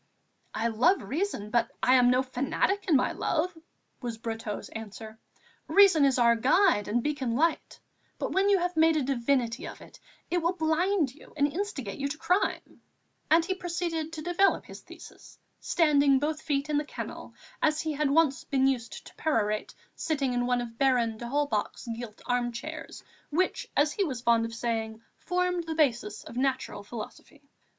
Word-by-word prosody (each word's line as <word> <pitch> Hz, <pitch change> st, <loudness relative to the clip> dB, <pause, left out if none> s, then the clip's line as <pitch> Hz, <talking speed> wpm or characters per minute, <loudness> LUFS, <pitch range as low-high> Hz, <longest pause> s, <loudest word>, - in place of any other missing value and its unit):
"I 230 Hz, +2 st, 0 dB
love 260 Hz, -, +3 dB
reason, 285 Hz, -, -3 dB
but 235 Hz, 0 st, +2 dB
I 255 Hz, -, +5 dB
am 250 Hz, -1 st, +6 dB
no 255 Hz, +1 st, +3 dB
fanatic 270 Hz, +10 st, -1 dB
in 325 Hz, -, +4 dB
my 255 Hz, -, +3 dB
love," 340 Hz, +2 st, -1 dB, 0.5 s
was 235 Hz, -3 st, -4 dB
Brotteaux's 225 Hz, -2 st, -5 dB
answer. 220 Hz, 0 st, -9 dB, 0.5 s
"Reason 390 Hz, -7 st, +6 dB
is 270 Hz, -2 st, +3 dB
our 235 Hz, -1 st, +5 dB
guide 265 Hz, -, +3 dB
and 235 Hz, +3 st, 0 dB
beacon 270 Hz, -6 st, -1 dB
light; 325 Hz, +5 st, 0 dB, 0.4 s
but -, -, -3 dB
when 390 Hz, +1 st, +2 dB
you 400 Hz, -, +5 dB
have 355 Hz, -1 st, -1 dB
made 320 Hz, 0 st, +4 dB
a 295 Hz, -, +1 dB
divinity 255 Hz, -1 st, 0 dB
of -, -, -9 dB
it, -, -, -15 dB, 0.3 s
it 350 Hz, -, +2 dB
will 340 Hz, +2 st, +1 dB
blind 320 Hz, -2 st, +1 dB
you 305 Hz, -, -17 dB
and 285 Hz, -, +4 dB
instigate 300 Hz, -, -4 dB
you 280 Hz, -, -1 dB
to 295 Hz, +2 st, -5 dB
crime," 355 Hz, +5 st, -1 dB, 0.5 s
and 325 Hz, +1 st, +5 dB
he 375 Hz, -, 0 dB
proceeded 340 Hz, -3 st, -3 dB
to 310 Hz, -1 st, -6 dB
develop 355 Hz, +3 st, +2 dB
his -, -, -11 dB
thesis, -, -, -14 dB, 0.2 s
standing 285 Hz, -5 st, +3 dB
both 305 Hz, +3 st, -2 dB
feet 285 Hz, -2 st, -1 dB
in 295 Hz, -1 st, +1 dB
the -, -, -2 dB
kennel, -, -, -8 dB, 0.3 s
as 310 Hz, -1 st, +2 dB
he 315 Hz, -, -2 dB
had 295 Hz, -1 st, 0 dB
once 295 Hz, -2 st, +3 dB
been 270 Hz, -2 st, +1 dB
used 250 Hz, -4 st, -1 dB
to -, -, -13 dB
perorate, 215 Hz, -8 st, -1 dB, 0.2 s
seated 280 Hz, -5 st, -1 dB
in 245 Hz, 0 st, 0 dB
one 245 Hz, -1 st, +1 dB
of 230 Hz, -1 st, -8 dB
Baron 245 Hz, -5 st, +2 dB
d'Holbach's 240 Hz, -3 st, -2 dB
gilt 225 Hz, -2 st, -9 dB
armchairs, 245 Hz, +5 st, -3 dB, 0.3 s
which, 355 Hz, +5 st, 0 dB
as 295 Hz, +1 st, +4 dB
he 395 Hz, -, 0 dB
was 270 Hz, -9 st, -3 dB
fond 235 Hz, -1 st, +3 dB
of 230 Hz, -, -6 dB
saying, 225 Hz, -1 st, -2 dB, 0.2 s
formed 360 Hz, -1 st, -1 dB
the 320 Hz, -1 st, -4 dB
basis 235 Hz, -8 st, 0 dB
of -, -, -11 dB
natural 260 Hz, -5 st, -1 dB
philosophy. 215 Hz, +2 st, -9 dB
275 Hz, 175 wpm, -28 LUFS, 235-325 Hz, 0.5 s, am